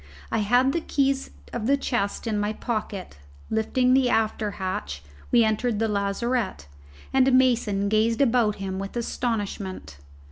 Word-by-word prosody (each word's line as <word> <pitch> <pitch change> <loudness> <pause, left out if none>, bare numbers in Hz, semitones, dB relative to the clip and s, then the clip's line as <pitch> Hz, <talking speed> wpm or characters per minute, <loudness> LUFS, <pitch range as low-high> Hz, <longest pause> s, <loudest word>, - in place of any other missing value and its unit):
I - - +1
had 245 +6 +3
the 335 - 0
keys 275 -3 0 0.2
of 235 -2 -2
the 280 +1 +4
chests 240 -7 -2
in 215 -2 -1
my 205 +1 -1
pocket: 210 - -4 0.3
lifting 250 +3 +2
the 260 -1 +4
after 220 -1 +1
hatch, 75 - -4 0.3
we 235 -1 +6
entered 220 +1 0
the 225 +1 +1
lazarette, 200 - -1 0.5
and 265 0 +4
Mason 235 -6 +3
gazed 220 +2 +2
about 235 -5 +3
him 190 -1 -4
with 195 +4 -5
astonishment. 205 - -3
220 Hz, 145 wpm, -25 LUFS, 200-250 Hz, 0.5 s, we